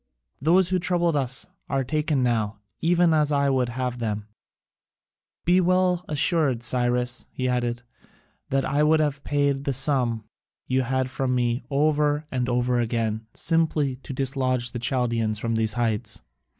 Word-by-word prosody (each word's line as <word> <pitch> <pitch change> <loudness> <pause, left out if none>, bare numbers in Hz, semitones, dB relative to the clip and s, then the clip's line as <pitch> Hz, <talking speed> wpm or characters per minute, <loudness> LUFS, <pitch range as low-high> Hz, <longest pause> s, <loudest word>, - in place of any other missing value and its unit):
Those 175 +4 +4
who 185 -1 +1
troubled 175 -2 +1
us 135 -1 0 0.2
are 135 -1 0
taken 150 0 0
now, 110 -4 0 0.2
even 170 0 +3
as 150 -1 +2
I 140 -1 +2
would 130 -2 +1
have 125 0 -3
them. 105 -2 -3 1.2
Be 180 +2 +4
well 180 0 +2
assured, 145 -5 +1
Cyrus," 125 +1 0
he 130 - -2
added, 120 -1 -1 0.7
"that 135 0 +1
I 145 - +1
would 155 +1 +4
have 145 -2 -1
paid 140 -1 0
the 140 - 0
sum 125 -4 +2 0.4
you 130 +1 +1
had 130 +1 0
from 130 -1 -1
me 120 0 0
over 150 +1 +1
and 125 -1 -1
over 125 0 +1
again 115 -2 -1
simply 155 -5 +1
to 135 - -10
dislodge 130 -2 0
the 120 - -5
Chaldaeans 115 -4 0
from 115 +2 -2
these 110 -1 +1
heights. 110 -1 -2
130 Hz, 150 wpm, -25 LUFS, 120-150 Hz, 1.2 s, Those